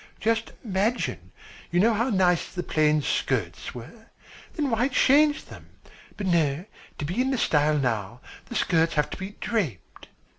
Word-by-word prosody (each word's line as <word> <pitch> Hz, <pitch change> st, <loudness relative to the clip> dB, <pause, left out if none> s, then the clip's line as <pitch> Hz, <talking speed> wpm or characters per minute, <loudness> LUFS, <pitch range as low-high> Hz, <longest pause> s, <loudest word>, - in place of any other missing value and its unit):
Just 225 Hz, 0 st, 0 dB
imagine, 210 Hz, +4 st, -1 dB, 0.4 s
you 175 Hz, -, +1 dB
know 225 Hz, +4 st, +4 dB
how 235 Hz, +4 st, 0 dB
nice 185 Hz, -5 st, +2 dB
the 180 Hz, -, -4 dB
plain 150 Hz, -2 st, +2 dB
skirts 110 Hz, -11 st, -2 dB
were. 220 Hz, -, -11 dB, 0.5 s
Then 290 Hz, -5 st, -1 dB
why 230 Hz, +3 st, +2 dB
change 290 Hz, +2 st, +3 dB
them? -, -, -13 dB, 0.5 s
But 205 Hz, -, -4 dB
no, 165 Hz, -2 st, +1 dB, 0.3 s
to 150 Hz, -, -3 dB
be 180 Hz, +11 st, -1 dB
in 265 Hz, 0 st, 0 dB
style 150 Hz, -6 st, +2 dB
now, 120 Hz, -4 st, -2 dB, 0.3 s
the 240 Hz, -, -7 dB
skirts 165 Hz, -6 st, +2 dB
have 150 Hz, -1 st, +1 dB
to -, -, -5 dB
be 195 Hz, +2 st, -7 dB
draped. 175 Hz, -, -3 dB
185 Hz, 155 wpm, -26 LUFS, 150-230 Hz, 0.5 s, know